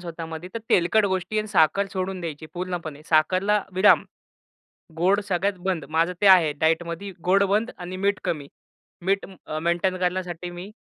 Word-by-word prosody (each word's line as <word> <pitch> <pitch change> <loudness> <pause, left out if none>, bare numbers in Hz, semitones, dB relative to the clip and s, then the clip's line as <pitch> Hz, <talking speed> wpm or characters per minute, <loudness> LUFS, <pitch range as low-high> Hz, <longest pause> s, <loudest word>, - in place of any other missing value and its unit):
स्वतःमध्ये 165 0 -7
तर 230 - -2
तेलकट 190 +5 +4
गोष्टी 190 +3 -1
आणि 215 - -1
साखर 195 +2 +3
सोडून 185 0 -3
द्यायची 155 -2 -6
पूर्णपणे. 175 -5 -5
साखरला 185 +6 +2
विराम, 190 +3 +5 0.9
गोड 190 +5 +3
सगळ्यात 190 +1 0
बंद. 180 -6 -1
माझं 165 +3 +1
ते 205 - +3
आहे 175 -5 +7
डायटमध्ये 170 +4 0
गोड 190 +3 +4
बंद 220 +4 +1
आणि 180 +1 -6
मीठ 200 +2 0
कमी. 145 -4 -3 0.6
मीठ 195 +1 +1 0.2
अ, 155 - -3
मेंटेन 175 +3 0
करण्यासाठी 180 -1 -2
मी, 175 +3 -8
180 Hz, 155 wpm, -24 LUFS, 165-195 Hz, 0.9 s, आहे